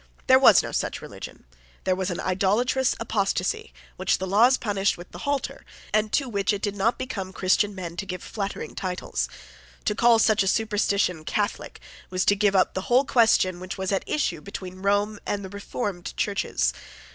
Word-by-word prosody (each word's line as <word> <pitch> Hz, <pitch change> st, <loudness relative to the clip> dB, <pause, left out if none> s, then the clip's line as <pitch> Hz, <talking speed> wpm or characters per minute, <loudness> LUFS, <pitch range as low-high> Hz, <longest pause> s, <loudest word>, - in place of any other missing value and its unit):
There -, -, +6 dB
was -, -, +7 dB
no -, -, -5 dB
such -, -, -2 dB
religion. -, -, -10 dB, 0.4 s
There 185 Hz, -, +1 dB
was 190 Hz, 0 st, -2 dB
an 175 Hz, -, -3 dB
idolatrous 210 Hz, +8 st, +1 dB
apostasy, 200 Hz, -5 st, -1 dB, 0.3 s
which 185 Hz, 0 st, +1 dB
the 190 Hz, -, -3 dB
laws 225 Hz, +7 st, +5 dB
punished 200 Hz, -3 st, 0 dB
with 175 Hz, +1 st, -11 dB
the -, -, -9 dB
halter, 285 Hz, -2 st, -2 dB, 0.3 s
and 215 Hz, 0 st, +2 dB
to 275 Hz, -, +2 dB
which 200 Hz, -5 st, 0 dB
it 205 Hz, -, -4 dB
did 205 Hz, -1 st, -1 dB
not 210 Hz, +4 st, +1 dB
become 195 Hz, -7 st, -5 dB
Christian 195 Hz, +2 st, +1 dB
men 175 Hz, -3 st, -6 dB
to 195 Hz, -, -4 dB
give 180 Hz, -1 st, -5 dB
flattering 200 Hz, -2 st, -5 dB
titles. 185 Hz, -1 st, -3 dB, 0.6 s
To -, -, +2 dB
call 235 Hz, +2 st, +5 dB
such 215 Hz, -1 st, +3 dB
a 195 Hz, -, 0 dB
superstition 200 Hz, -5 st, +1 dB
Catholic 205 Hz, +5 st, -2 dB, 0.3 s
was 185 Hz, 0 st, 0 dB
to 205 Hz, -, +4 dB
give 200 Hz, -1 st, +2 dB
up 185 Hz, -, +3 dB
the 190 Hz, -, -2 dB
whole 255 Hz, +3 st, +5 dB
question 220 Hz, -8 st, +3 dB
which 185 Hz, +1 st, -6 dB
was 190 Hz, 0 st, -2 dB
at 195 Hz, -, 0 dB
issue 175 Hz, -, -1 dB
between 185 Hz, 0 st, -8 dB
Rome 205 Hz, +1 st, +1 dB
and 200 Hz, -1 st, -2 dB
the -, -, -7 dB
reformed 200 Hz, -2 st, -5 dB
Churches. 65 Hz, -, 0 dB
200 Hz, 185 wpm, -25 LUFS, 185-215 Hz, 0.6 s, was